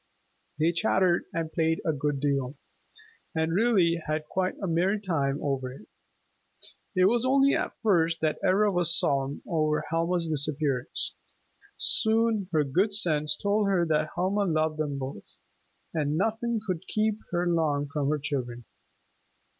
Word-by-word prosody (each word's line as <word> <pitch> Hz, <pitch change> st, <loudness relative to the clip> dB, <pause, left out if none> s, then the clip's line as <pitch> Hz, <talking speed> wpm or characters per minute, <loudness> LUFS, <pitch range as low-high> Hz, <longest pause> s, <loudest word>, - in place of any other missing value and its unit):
They 160 Hz, +2 st, +2 dB
chattered 175 Hz, +1 st, +2 dB
and 165 Hz, -1 st, -4 dB
played 160 Hz, -1 st, +1 dB
a 160 Hz, -, +1 dB
good 145 Hz, -1 st, -2 dB
deal, 140 Hz, -1 st, -1 dB, 0.8 s
and 160 Hz, 0 st, 0 dB
really 185 Hz, -5 st, +3 dB
had 155 Hz, 0 st, -2 dB
quite 185 Hz, +4 st, -2 dB
a 200 Hz, -, -3 dB
merry 185 Hz, +4 st, +1 dB
time 145 Hz, -8 st, -1 dB
over 135 Hz, -3 st, -2 dB
it. 125 Hz, -4 st, -13 dB, 1.1 s
It 185 Hz, 0 st, +4 dB
was 235 Hz, +4 st, +3 dB
only 275 Hz, +2 st, +4 dB
at -, -, -2 dB
first 165 Hz, -6 st, +2 dB
that 155 Hz, -1 st, 0 dB
Ivra 205 Hz, +2 st, +3 dB
was 175 Hz, -3 st, +2 dB
solemn 140 Hz, 0 st, -1 dB
over 155 Hz, -2 st, 0 dB
Helma's 165 Hz, +1 st, 0 dB
disappearance. 145 Hz, -3 st, -1 dB, 0.6 s
Soon 220 Hz, -3 st, +2 dB
her 155 Hz, -3 st, +2 dB
good 190 Hz, +9 st, +1 dB
sense 150 Hz, -6 st, +2 dB
told 205 Hz, 0 st, +1 dB
her 185 Hz, -3 st, +2 dB
that 155 Hz, 0 st, +1 dB
Helma 200 Hz, +3 st, 0 dB
loved 155 Hz, -2 st, 0 dB
them 145 Hz, -2 st, -2 dB
both, 130 Hz, -6 st, -7 dB, 0.6 s
and 150 Hz, -1 st, 0 dB
nothing 225 Hz, +4 st, 0 dB
could 185 Hz, -2 st, -4 dB
keep 215 Hz, 0 st, 0 dB
her 175 Hz, 0 st, -1 dB
long 155 Hz, -4 st, +1 dB
from 140 Hz, 0 st, -2 dB
her 150 Hz, -, +1 dB
children. 125 Hz, -5 st, -4 dB
165 Hz, 145 wpm, -27 LUFS, 150-190 Hz, 1.1 s, It